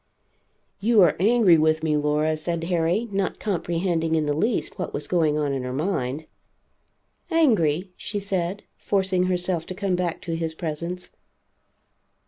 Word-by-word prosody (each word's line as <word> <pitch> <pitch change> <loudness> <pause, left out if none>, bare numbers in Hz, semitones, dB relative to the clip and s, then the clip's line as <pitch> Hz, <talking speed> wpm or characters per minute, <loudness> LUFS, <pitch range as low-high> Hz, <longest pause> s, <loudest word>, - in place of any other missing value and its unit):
"You 220 +2 +3
are 170 - +4
angry 205 -4 +5
with 155 0 +2
me, 155 -1 +1
Laura," 150 +1 +1
said 165 +1 -3
Harry, 175 +6 0
not 195 -1 -1
comprehending 170 -4 -1
in 155 -1 +1
the 145 - 0
least 210 +6 -1
what 180 - -3
was 145 - -4
going 160 -4 +1
on 145 -2 0
in 135 - -2
her 125 0 -4
mind. 145 -1 -2 1.0
"Angry?" 190 - +2
she 210 - -5
said, 195 -1 -2
forcing 190 -2 +1
herself 180 -2 -1
to 185 - -6
come 195 -2 0
back 175 -2 -2
to 170 -3 -3
his 165 -1 -3
presence. 170 +3 -4
170 Hz, 150 wpm, -24 LUFS, 155-190 Hz, 1.0 s, angry